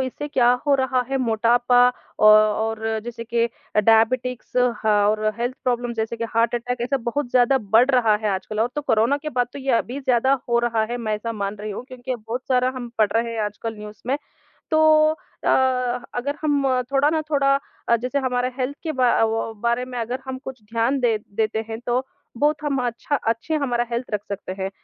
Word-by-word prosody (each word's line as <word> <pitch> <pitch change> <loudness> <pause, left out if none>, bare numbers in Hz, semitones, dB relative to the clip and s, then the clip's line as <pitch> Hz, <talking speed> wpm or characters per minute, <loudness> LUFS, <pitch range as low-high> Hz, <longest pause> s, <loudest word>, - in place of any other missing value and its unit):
इससे 295 +3 -6
क्या 245 -4 +3 0.2
हो 285 - +5
रहा 260 -1 +1
है 270 - +1
मोटापा 240 +1 +3 0.3
औ 215 - +6 0.4
और 225 0 -2 0.2
जैसे 235 -1 -6
के 235 0 +1 0.3
अ, - - +6
डायबिटीज़ 235 +4 +2
और 215 -3 +2
हेल्थ 245 +2 -1
प्रॉब्लम 245 -1 0
जैसे 225 +1 -2
कि 230 - -3
हार्ट 230 +1 +2
अटैक 245 +1 -3
ऐसा 255 +3 0
बहुत 280 0 -2
ज़्यादा 255 +2 +4
बढ़ 240 +4 +6
रहा 240 -5 +4
है 215 - +1
आजकल। 210 +3 -4
और 230 - +2
तो 295 - -1
कोरोना 235 +1 +2
के 305 - -3
बाद 245 -2 +1
तो - - -7
ये 270 -1 -1
अभी 250 +4 -4
ज़्यादा 260 +1 +2
हो 235 0 +3
रहा 235 -2 +1
है, 240 - -1
मैं 220 -3 -2
ऐसा 230 +2 -4
मान 200 -1 -3
रही 215 0 -5
हूँ 205 +5 -6
क्योंकि 255 0 -5
बहुत 230 +1 -5
सारा 255 -1 +3
हम 245 -2 -5
पढ़ 215 -2 +3
रहे 230 0 0
हैं 225 - -3
आजकल 210 +2 -5
न्यूज़ 210 0 -10
में। 270 - +1 0.6
तो 315 - +4 0.3
अ, 315 - -9 0.7
अगर 280 +4 -2
हम 290 -2 +1 0.3
थोड़ा 280 +2 +3
ना 315 0 0
थोड़ा 275 -1 +3 0.4
जैसे 255 +3 -1
हमारा 250 -1 -1
हेल्थ 265 +2 -2
के 320 - -2
बा 255 -1 +3 0.2
व 225 0 -1
बारे 235 +1 +1
में 255 -1 -7
अगर 240 +3 -3
हम 260 0 -4
कुछ 265 -4 -8
ध्यान 230 +5 0
दे 235 -3 +2 0.2
देते 220 0 0
हैं 225 0 -5
तो 250 +2 0 0.3
बहुत 300 +2 +2
हम 285 -2 0
अच्छा 240 +4 -2
अच्छी 230 +8 -2
हमारा 250 -6 0
हेल्थ 235 +2 -2
रख 210 - 0
सकते 200 -2 -5
हैं। 190 - -1
240 Hz, 205 wpm, -22 LUFS, 225-260 Hz, 0.7 s, औ